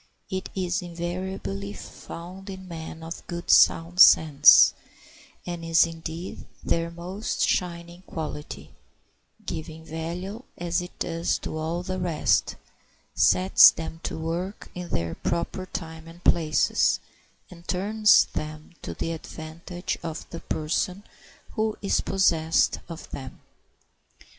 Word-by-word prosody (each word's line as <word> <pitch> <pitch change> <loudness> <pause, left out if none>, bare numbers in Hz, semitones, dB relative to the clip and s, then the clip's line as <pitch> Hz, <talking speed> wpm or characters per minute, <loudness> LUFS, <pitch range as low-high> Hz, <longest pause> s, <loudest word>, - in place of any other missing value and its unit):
It 190 0 -3
is 185 0 -1
invariably 175 - -4
found 180 - -10
in 190 -1 -8
men 160 -1 -8
of 165 +1 -8
good 170 0 -2
sound 170 +2 +5
sense, 155 -5 +8 0.7
and 175 -1 -5
is, 165 0 +5
indeed, 165 +1 -7 0.2
their 165 0 0
most 180 +6 -2
shining 170 0 -2
quality, 150 -2 -6 0.7
giving 160 0 -6
value 175 +7 -5 0.2
as 175 +1 -1
it 180 - -10
does 165 0 -1
to - - -4
all 160 +3 -2
the 185 0 -3
rest, 175 -4 +1 0.6
sets 90 +1 +7
them 160 0 -6
to - - -4
work 170 +5 -4
in 180 -1 -7
their 85 0 -2
proper 175 +2 -3
time 160 -3 -7
and 170 +2 -14
places, 155 -3 +3 0.5
and 170 -1 -14
turns 210 +3 +4
them 155 +1 -6
to - - -6
the 165 - -3
advantage 165 +2 -6
of 165 -1 -6
the 170 - -6
person 180 +6 -2 0.5
who 220 -1 -1
is 200 - +2
possessed 165 -4 +2
of 165 -1 -8
them. 130 -1 -8
170 Hz, 125 wpm, -26 LUFS, 160-180 Hz, 0.7 s, sense